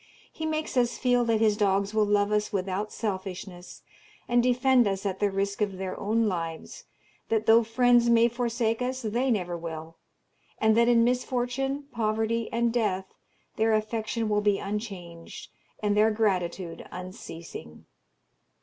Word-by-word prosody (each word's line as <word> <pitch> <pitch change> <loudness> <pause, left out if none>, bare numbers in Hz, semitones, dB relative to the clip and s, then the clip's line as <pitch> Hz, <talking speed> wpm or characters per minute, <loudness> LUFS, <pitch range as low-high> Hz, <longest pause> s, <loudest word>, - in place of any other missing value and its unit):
He 315 - -4
makes 310 -3 -2
us 240 -1 +2
feel 245 -1 +2
that 225 -1 +1
his 215 -2 +4
dogs 200 -1 +1
will 215 -1 +2
love 205 0 +2
us 210 0 0
without 195 +2 -2
selfishness, 190 -3 -6 0.4
and 240 0 +3
defend 250 -1 +3
us 195 0 -2
at 190 -1 -2
the 205 - +2
risk 200 +1 -2
of 200 -2 -1
their 190 -1 -4
own 220 +2 +1
lives 165 -4 -5 0.4
that 220 -1 +1
though 225 +1 +6
friends 240 +1 +3
may 235 0 +5
forsake 235 -1 -1
us, 255 +1 -2
they 240 +5 0
never 180 -7 0
will 165 -1 -7 0.6
and 220 0 +3
that 235 +1 +4
in 235 -1 +5
misfortune, 250 +3 -1
poverty, 225 0 -1
and 235 0 +1
death, 195 -5 -1 0.4
their 220 0 +3
affection 220 +1 -2
will 210 -1 +1
be 205 -1 +2
unchanged, 195 -6 -7 0.3
and 205 -1 +2
their 215 +1 +5
gratitude 185 -5 -1
unceasing. 170 - -9
215 Hz, 150 wpm, -27 LUFS, 195-235 Hz, 0.6 s, though